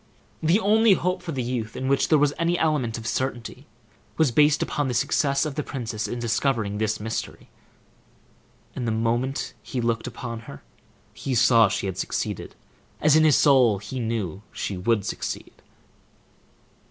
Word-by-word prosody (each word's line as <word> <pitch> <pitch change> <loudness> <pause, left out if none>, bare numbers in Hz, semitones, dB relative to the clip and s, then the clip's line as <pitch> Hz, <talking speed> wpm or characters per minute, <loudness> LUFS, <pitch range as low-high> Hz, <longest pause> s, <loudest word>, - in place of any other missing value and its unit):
The 165 +6 +3
only 220 0 +4
hope 180 0 -1
for 175 -2 -5
the 130 -4 -2
youth 120 -2 -3
in 130 - -3
which 135 0 +2
there 155 - +4
was 145 0 +2
any 170 +1 +1
element 145 -9 0
of 115 - -8
certainty 125 +2 -3 0.5
was 155 -5 +3
based 150 +3 +4
upon 145 -2 -2
the 125 - -2
success 140 +2 +1
of 150 - -3
the 150 - -2
princess 115 -6 -4
in 120 - -4
discovering 115 -3 -1
this 110 0 0
mystery; 110 +1 -5 1.3
and 125 - -3
the - - +1
moment 120 +4 -1
he 130 - -5
looked 115 -1 -1
upon 115 -2 -6
her, 70 - -10 0.5
he 130 - -3
saw 115 -2 +5
she - - -2
had 95 -1 -4
succeeded, - - -3 0.4
as 155 0 +4
in 155 - +5
his 155 -3 +5
soul 130 -8 +5
he 125 +6 -6
knew 110 -6 -3
she 100 - -4
would 100 +2 0
succeed. - - -5
125 Hz, 165 wpm, -24 LUFS, 115-150 Hz, 1.3 s, saw